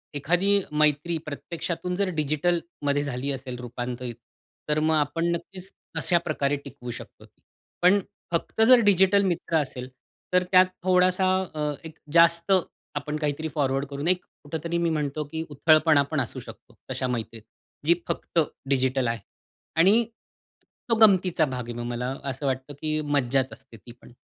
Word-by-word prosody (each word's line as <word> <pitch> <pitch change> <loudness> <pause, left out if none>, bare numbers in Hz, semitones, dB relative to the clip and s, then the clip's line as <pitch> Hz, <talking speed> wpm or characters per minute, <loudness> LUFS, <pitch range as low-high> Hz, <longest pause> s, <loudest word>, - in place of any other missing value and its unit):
एखादी 180 +8 +3
मैत्री 150 +2 +2
प्रत्यक्षातून 170 +4 -4
जर 195 0 0
डिजिटलमध्ये 150 -1 -1
झाली 140 0 -2
असेल 130 -2 -5
रूपांतरित 120 0 -5 0.5
तर 150 0 +2
मग 160 +1 +2
आपण 155 +3 0
नक्कीच 185 +2 -8 0.3
अशा 175 - +3
प्रकारे 145 -3 0
टिकवू 130 -3 -8
शकतो. - - -11 0.6
पण 185 +3 +5 0.3
फक्त 170 +6 -1
जर 255 0 +8
डिजिटल 195 +1 +5
मित्र 170 -2 0
असेल 130 -4 -3 0.5
तर 180 0 +4
त्यात 185 0 +7 0.2
थोडासा 185 0 +3 0.3
अ, 150 -1 -1
एक 160 -1 -10 0.2
जास्त 170 +2 +5 0.4
आपण 150 +1 -3
काहीतरी 150 +1 -2
फॉरवर्ड 135 -1 0
करू 140 0 -6
नाही, 180 +3 +3 0.3
कुठेतरी 160 +3 -3
मी 170 0 +1
म्हणतो 150 -1 -2
की 160 0 -3
उथळपणा 155 0 +4
पण 155 - 0
असू 120 - -5
शकतो - - -13 0.2
तशा 130 - -2
मैत्रीत. 115 -2 -4 0.4
जी 170 - +6
फक्त - - -1 0.3
डिजिटल 130 -1 +1
आहे 115 0 -1 0.6
आणि 200 +7 +5 0.9
तो 230 - +4
गमतीचा 185 -5 +3
भाग 130 -3 -4
आहे 120 - -3
मग 120 - -4
मला 125 +2 -3
असं 135 +2 -5
वाटतं 135 +1 -2
की 155 0 0
मज्जाच 135 -3 0
असते 130 -4 -15
ती 120 - -13
पण. - - -15
150 Hz, 150 wpm, -26 LUFS, 135-170 Hz, 0.9 s, जर